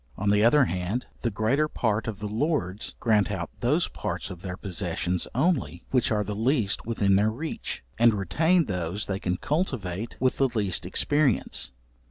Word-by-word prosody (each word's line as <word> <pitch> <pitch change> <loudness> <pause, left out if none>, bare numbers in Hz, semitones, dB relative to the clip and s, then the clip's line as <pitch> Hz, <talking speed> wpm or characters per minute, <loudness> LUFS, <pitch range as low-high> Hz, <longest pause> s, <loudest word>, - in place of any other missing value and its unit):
On 105 0 +1
the 105 0 +4
other 135 +4 +6
hand, 95 +5 -2 0.2
the 120 - +1
greater 115 +8 +1
part 110 -6 -1
of 110 -3 -3
the 105 - -6
lords 110 - -1
grant 105 -4 +3
out 95 -5 -3
those 150 +8 +2
parts 95 -1 -4
of 90 -1 -9
their 90 -1 -5
possessions 90 -1 -2
only, 125 - +1
which 125 -3 +3
are 105 -1 +2
the 105 - -4
least 110 -1 0
within 100 -4 +3
their 105 +2 +3
reach, 145 - -5 0.2
and 115 -2 +6
retain 160 - +2
those 90 0 -2
they 95 -1 -2
can 90 -1 -1
cultivate 115 - -2
with 130 0 +1
the 135 - +4
least 100 - -2
expence. 145 - +1
105 Hz, 175 wpm, -26 LUFS, 95-130 Hz, 0.2 s, other